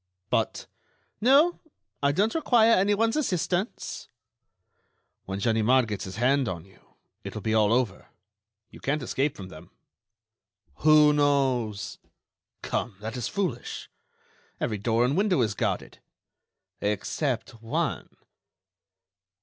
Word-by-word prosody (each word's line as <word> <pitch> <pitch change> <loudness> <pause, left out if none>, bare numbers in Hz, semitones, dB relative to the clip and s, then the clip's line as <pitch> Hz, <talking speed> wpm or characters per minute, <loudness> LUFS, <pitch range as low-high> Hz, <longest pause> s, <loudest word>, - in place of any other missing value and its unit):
"But—" - - 0 0.6
"No, 285 +9 +5 0.4
I 140 0 +3
don't 205 +9 +1
require 235 -8 +4
anyone's 205 +3 +3
assistance." 190 - -2 1.2
"When 95 0 -4
Ganimard 115 +3 +3
gets 105 -3 -4
his 95 - -7
hand 130 +3 +2
on 85 -2 -6
you, 95 - -24 0.3
it - - -7
will 105 - -6
be 110 - 0
all 110 -1 +3
over. 115 -5 0 0.6
You - - -13
can't 140 +1 -1
escape 135 +3 -1
from 95 -2 -8
them." 80 -3 -12 1.1
"Who 150 -1 +6
knows?" 130 -8 0 0.6
"Come, 115 -4 -2
that 110 +2 -6
is 125 - -3
foolish. 180 -12 -4 0.7
Every 105 -3 -2
door 115 +3 +2
and 135 +4 +1
window 195 -3 +2
is 110 -3 +1
guarded." - - -3 0.8
"Except 105 +2 -2
one." 115 0 -2
130 Hz, 115 wpm, -27 LUFS, 110-180 Hz, 1.2 s, Who